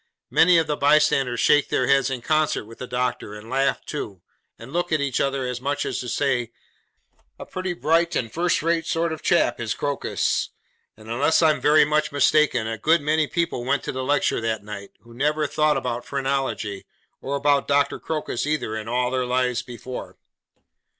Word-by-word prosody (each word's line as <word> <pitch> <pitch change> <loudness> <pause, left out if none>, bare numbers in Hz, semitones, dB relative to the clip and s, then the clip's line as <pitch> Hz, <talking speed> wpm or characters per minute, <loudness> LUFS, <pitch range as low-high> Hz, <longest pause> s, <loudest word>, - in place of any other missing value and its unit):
Many 175 +1 +5
of 165 - +3
the 150 - -1
bystanders 140 -4 +3
shake 145 -1 +4
their 130 - +1
heads 135 0 +3
in 125 -3 -4
concert 155 -7 +1
with 115 +1 -14
the 125 - -6
doctor, 125 -4 -2
and 110 +3 -11
laugh 135 +1 0
too, 100 - -6 0.3
and 120 +5 -11
look 175 0 -1
at 155 - +2
each 140 -3 -1
other 135 -1 -1
as 125 -1 -4
much 140 +2 -1
as - - -2
to 125 - -5
say, 125 -3 0 0.9
'A - - -7
pretty 185 -1 -4
bright 165 +1 +1
and 115 -2 -2
first 170 0 +1
rate 165 0 0
sort 165 0 0
of 160 - -8
chap 145 -8 +2
is 110 -4 -2
Crocus!' 145 -1 -1 0.5
and 110 0 -15
unless 140 +9 +2
I 160 - +6
am - - -3
very 150 0 +5
much 155 0 0
mistaken, 145 -3 +3
a 110 0 -4
good 165 +1 +3
many 155 +1 +1
people 170 -8 -2
went 140 +3 0
to - - -3
the 130 0 -4
lecture 145 -2 +1
that 110 -2 -2
night, 100 -1 -8
who 115 0 -16
never 150 +4 0
thought 150 +1 +1
about 120 -1 -3
phrenology, 135 -7 -2 0.3
or 140 - -3
about 140 0 +2
Doctor 140 0 +1
Crocus 150 -4 -3
either, 150 -8 -1
in 110 0 -5
all 125 +1 0
their 130 -1 -1
lives 125 -1 0
before. 125 +1 -8
140 Hz, 195 wpm, -23 LUFS, 120-155 Hz, 0.9 s, I